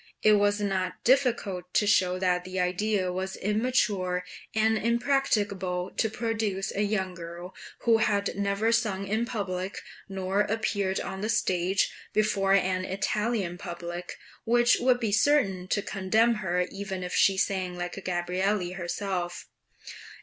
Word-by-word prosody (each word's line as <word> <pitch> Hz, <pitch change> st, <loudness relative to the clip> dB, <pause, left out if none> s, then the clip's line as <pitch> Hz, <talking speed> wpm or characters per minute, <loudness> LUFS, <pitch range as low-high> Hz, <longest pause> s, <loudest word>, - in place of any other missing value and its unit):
It 215 Hz, -, +6 dB
was 205 Hz, 0 st, +3 dB
not 190 Hz, -3 st, -2 dB
difficult 230 Hz, -9 st, +1 dB
to 210 Hz, -, +4 dB
show 185 Hz, -3 st, +3 dB
that 180 Hz, -1 st, +1 dB
the 185 Hz, +1 st, -4 dB
idea 185 Hz, +1 st, 0 dB
was 190 Hz, +1 st, -3 dB
immature 205 Hz, -5 st, 0 dB, 0.3 s
and 220 Hz, 0 st, +3 dB
impracticable 215 Hz, -7 st, 0 dB
of 220 Hz, -1 st, -2 dB
producing 215 Hz, -4 st, -2 dB
a 200 Hz, -, 0 dB
young 195 Hz, -3 st, 0 dB
girl, 175 Hz, +1 st, -8 dB, 0.3 s
who 230 Hz, -1 st, +4 dB
had 205 Hz, -2 st, +1 dB
never 200 Hz, +3 st, +1 dB
sung 210 Hz, -4 st, 0 dB
in 220 Hz, +4 st, 0 dB
public, 190 Hz, -4 st, -3 dB, 0.3 s
nor 190 Hz, +1 st, 0 dB
appeared 205 Hz, -2 st, 0 dB
on 190 Hz, -, -5 dB
the 215 Hz, -, -2 dB
stage, 185 Hz, -2 st, +1 dB, 0.2 s
before 205 Hz, -2 st, +2 dB
an 185 Hz, -1 st, +1 dB
Italian 200 Hz, -1 st, -1 dB
public, 175 Hz, -1 st, -6 dB, 0.3 s
which 240 Hz, +1 st, +4 dB
would 250 Hz, 0 st, +3 dB
be 225 Hz, -4 st, -1 dB
certain 200 Hz, -7 st, +2 dB
to 205 Hz, +2 st, 0 dB
condemn 215 Hz, +5 st, +2 dB
her 180 Hz, -1 st, 0 dB
even 195 Hz, -2 st, -5 dB
if 180 Hz, -, -5 dB
she 195 Hz, -1 st, +4 dB
sang 185 Hz, -2 st, -1 dB
like 175 Hz, +2 st, -5 dB
Gabrielli 180 Hz, +1 st, -1 dB
herself. 180 Hz, -1 st, -3 dB
195 Hz, 140 wpm, -28 LUFS, 185-215 Hz, 0.3 s, It